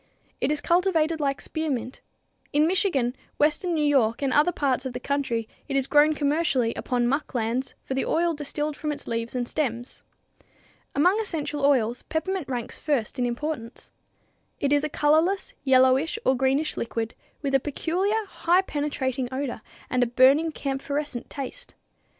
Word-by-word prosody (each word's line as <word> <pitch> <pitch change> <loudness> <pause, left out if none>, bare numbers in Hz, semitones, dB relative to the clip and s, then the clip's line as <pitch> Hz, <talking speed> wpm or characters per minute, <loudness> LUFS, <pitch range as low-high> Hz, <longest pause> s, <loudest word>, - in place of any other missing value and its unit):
It 265 - +1
is 300 -1 0
cultivated 335 -2 +2
like 275 -2 -1
spearmint. 280 -6 -3 0.5
In 295 +2 +4
Michigan, 320 - +1 0.2
western 310 +4 +2
New 305 -1 +1
York 265 -4 +2
and 270 - +1
other 300 +4 +4
parts 275 -6 0
of 260 -2 -4
the 250 - -4
country 255 -5 -1 0.2
it 275 - -3
is 270 -1 +2
grown 295 +2 +4
commercially 285 -5 +1
upon 245 -1 -1
muck 280 +2 -1
lands 235 +3 -1
for - - -4
the 265 - 0
oil 340 +1 +1
distilled 295 0 -3
from 300 +1 -3
its 295 - -7
leaves 230 +1 -3
and 245 -1 -1
stems. 245 -4 -3 0.9
Among 360 +9 +4
essential 300 -8 -2
oils, 250 -4 +2
peppermint 320 -1 -3
ranks 245 -3 -4
first 275 -4 -1
in 245 - +2
importance. 245 -1 -5 0.7
It 280 0 +1
is 290 0 +3
a 305 - -1
colorless, 325 - +2
yellowish 265 +7 +4
or 260 - +4
greenish 270 +4 +1
liquid, 230 -1 -3 0.3
with 275 -1 -1
a 270 - +5
peculiar, 370 - -1
highly 360 0 +2
penetrating 275 -5 -2
odor 260 -3 -3 0.3
and 250 - 0
a 245 - +3
burning, 270 +7 +4
camphorescent 280 -2 -3
taste. 285 - -7
285 Hz, 160 wpm, -25 LUFS, 255-310 Hz, 0.9 s, a